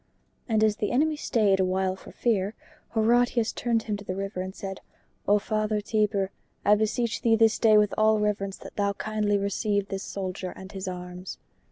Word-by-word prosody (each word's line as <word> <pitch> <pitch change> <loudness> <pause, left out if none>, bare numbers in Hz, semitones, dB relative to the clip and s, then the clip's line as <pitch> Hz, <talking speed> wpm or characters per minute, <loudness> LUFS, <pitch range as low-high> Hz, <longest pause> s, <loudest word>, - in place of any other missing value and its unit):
And 220 -1 +3
as 215 -1 +3
the 210 - -1
enemy 305 +5 +2
stayed 210 -9 +2
a - - +4
while 185 0 0
for - - -13
fear, 210 -3 0 0.4
Horatius 235 +1 +3
turned 230 -2 0
him 210 -1 -2
to 200 - -10
the 185 -2 -4
river 195 -1 -3
and 190 +1 -6
said, 190 -1 -6 0.5
"O 205 - +5
Father 215 0 -1
Tiber, 205 -2 0 0.3
I 205 - +6
beseech 220 +1 0
thee 230 -3 +4
this 225 -1 +3
day 220 -2 +6
with 210 -1 +3
all 215 0 +5
reverence 200 -2 -1
that - - -12
thou 200 -1 +1
kindly 210 0 0
receive 200 0 -1
this 195 0 -3
soldier 185 -1 -4
and 190 +1 -10
his 190 -1 -6
arms." 180 0 -6
210 Hz, 190 wpm, -27 LUFS, 195-220 Hz, 0.5 s, I